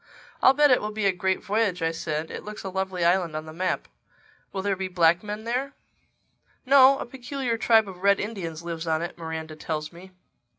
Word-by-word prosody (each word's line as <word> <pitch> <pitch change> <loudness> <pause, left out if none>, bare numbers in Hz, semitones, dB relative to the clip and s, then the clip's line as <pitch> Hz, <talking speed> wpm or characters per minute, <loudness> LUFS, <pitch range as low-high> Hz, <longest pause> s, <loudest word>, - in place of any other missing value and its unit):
"I'll 265 - +6
bet 295 -1 +5
it 250 - +4
will 210 - -3
be 215 -1 -2
a 195 - +5
great 190 +1 -1
voyage," 200 -4 0
I 165 - +1
said. 155 -1 -4
"It - - -7
looks 210 0 -8
a 190 - -4
lovely 190 -2 -2
island 175 -2 +2
on 155 0 -4
the 155 - -9
map. 185 +3 -2 0.6
Will 190 - -4
there 200 -1 +1
be 190 0 -3
black 175 -1 +3
men 210 +1 -6
there?" 255 +4 -2 0.9
"No. 270 0 +7
A - - -5
peculiar 250 0 -3
tribe 225 -1 +4
of 185 -2 -10
Red 200 0 +4
Indians 175 -7 -5
lives 170 -1 -5
on 160 0 0
it, 175 - -5
Miranda 160 -1 -6
tells 155 0 -4
me." 185 +2 -13
190 Hz, 210 wpm, -25 LUFS, 170-220 Hz, 0.9 s, No